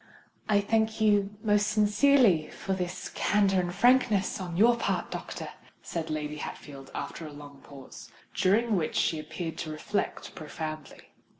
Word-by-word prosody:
"I 205 -1 +4
thank 220 +1 0
you 205 -1 +2
most 210 -1 +3
sincerely 210 - +4
for 195 - -4
this 180 0 -4
candour 200 -2 +2
and 175 -1 -1
frankness 220 -3 +3
on 175 -2 -5
your 235 +4 +6
part, 235 - -2
doctor," - - -6 0.3
said 165 -2 -4
Lady 150 -1 -3
Hatfield, 140 -2 -8
after 160 - -5
a - - -9
long 145 -1 -12
pause, 140 -2 -12 0.2
during 220 +4 +2
which 165 -4 -1
she 160 - +1
appeared 155 +2 -6
to 160 - -4
reflect 155 +6 -3
profoundly. 155 -1 -7
185 Hz, 145 wpm, -28 LUFS, 155-210 Hz, 0.3 s, your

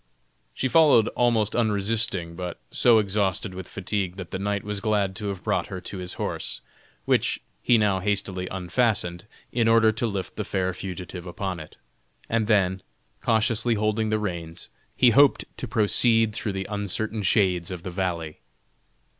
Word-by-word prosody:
She 130 - 0
followed 140 -6 +5
almost 115 -4 +1
unresisting, 105 -5 0
but 90 -1 -5
so 120 -2 +5
exhausted 100 -2 0
with 95 -1 -7
fatigue 95 -1 -3
that 95 -3 -8
the 95 - -3
knight 100 0 -1
was 105 -1 -3
glad 100 -3 0
to 105 -2 -4
have 95 -3 -5
brought - - 0
her 95 - -6
to 95 +1 -7
his 90 -1 -4
horse, - - -3 0.5
which - - +2 0.2
he 120 - +4
now 100 -3 +2
hastily 95 -2 -1
unfastened, 95 -1 -1 0.2
in 115 -2 +1
order 115 -1 +5
to 115 +2 -1
lift 100 -3 -4
the - - -1
fair 95 -1 -1
fugitive 90 -1 -7
upon 95 0 -4
it; 75 - -11 0.5
and 115 -2 0
then, 95 -4 +2 0.4
cautiously 115 +1 +1
holding 110 +1 0
the 110 - +1
reins, 85 -6 -5 0.2
he 125 -2 +5
hoped 140 +4 +5
to - - -5
proceed 115 0 +3
through 105 -2 -3
the 95 0 -3
uncertain 105 +1 -3
shades 90 -3 +2
of 90 -2 -6
the 90 - -5
valley. 85 -4 -3
100 Hz, 165 wpm, -25 LUFS, 90-110 Hz, 0.5 s, followed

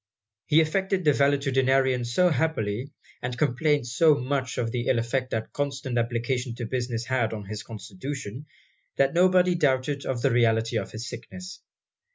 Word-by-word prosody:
He 160 +1 +5
affected 190 +3 0
the 150 - +6
valetudinarian 135 -2 +2
so 180 +10 +3
happily, 130 -6 -1 0.3
and 125 0 -4
complained 145 +1 +1
so 150 +5 +4
much 130 -1 -2
of 115 -2 -1
the 120 0 -2
ill 125 - +3
effect 125 +2 -1
that 110 -2 -4
constant 140 -3 -2
application 120 +1 -2
to 120 - -5
business 120 -1 -3
had 120 -4 0
on 105 -2 -6
his 105 +2 -6
constitution, 115 +5 -7 0.5
that 135 0 +2
nobody 180 +1 +4
doubted 140 -3 0
of 125 -2 -2
the 135 - +3
reality 115 -1 +2
of - - -6
his 115 +3 -6
sickness. 185 +7 -9
130 Hz, 160 wpm, -26 LUFS, 120-145 Hz, 0.5 s, the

